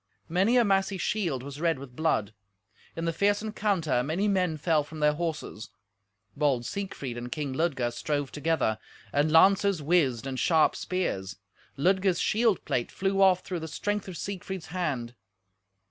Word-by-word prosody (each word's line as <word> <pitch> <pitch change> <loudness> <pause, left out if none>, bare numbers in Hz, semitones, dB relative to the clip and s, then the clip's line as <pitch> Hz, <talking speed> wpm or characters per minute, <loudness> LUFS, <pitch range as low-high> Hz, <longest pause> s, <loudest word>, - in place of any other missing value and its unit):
Many 195 +9 +3
a 240 - +5
massy 195 -1 +1
shield 175 - -1
was 140 +2 -8
red 165 -3 +2
with 130 -2 -11
blood. 110 -10 0 0.6
In 165 - -3
the 165 - 0
fierce 205 +4 +1
encounter 200 - 0
many 160 +10 0
men 180 -5 +1
fell 155 0 +2
from 155 +2 -10
their 150 0 +3
horses. 155 -9 -4 0.7
Bold 140 -5 +1
Siegfried 135 -8 -5
and 120 +1 -7
King 150 -4 -3
Ludger 135 -5 0
strove 145 +3 -2
together, 150 -8 0 0.3
and 145 +2 +2
lances 195 +3 +5
whizzed, 140 -6 +1
and 130 -1 -3
sharp 160 +1 +3
spears. 100 - -2 0.4
Ludger's 185 +3 +2
shield 220 -3 +2
plate 120 - -1
flew 195 0 0
off 185 -1 +5
through 180 -2 -4
the 160 - -6
strength 205 +6 -3
of 180 -3 -7
Siegfried's 190 -3 -5
hand. 140 -10 -2
160 Hz, 160 wpm, -28 LUFS, 140-190 Hz, 0.7 s, a